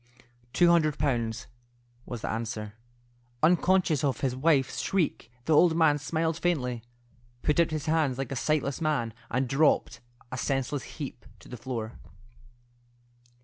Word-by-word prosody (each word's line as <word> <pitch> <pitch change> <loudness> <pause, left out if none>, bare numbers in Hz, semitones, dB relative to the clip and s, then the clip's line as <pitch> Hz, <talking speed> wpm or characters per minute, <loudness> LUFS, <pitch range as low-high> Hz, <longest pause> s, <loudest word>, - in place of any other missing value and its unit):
"Two 175 +5 +4
hundred 155 -3 +3
pounds," 115 -5 -1 0.6
was 120 -3 -6
the - - -3
answer. 110 -2 -4 0.7
Unconscious 175 -2 +3
of 140 -3 0
his 130 -2 0
wife's 135 -1 +2
shriek, 165 -10 -1
the 160 - +2
old 165 +2 +5
man 150 -3 +4
smiled 160 +3 -1
faintly, 125 -9 -1 0.6
put 150 +2 +2
out 170 - +4
his 155 -2 -3
hands 155 -5 +1
like 135 -1 -4
a - - -2
sightless 145 +1 0
man, 145 -8 0 0.2
and 130 +2 0
dropped, 135 -2 +2 0.3
a 130 - -4
senseless 135 +1 -2
heap, 140 -5 -7
to - - -17
the 125 - -8
floor. 115 -2 -5
140 Hz, 145 wpm, -28 LUFS, 125-160 Hz, 0.7 s, old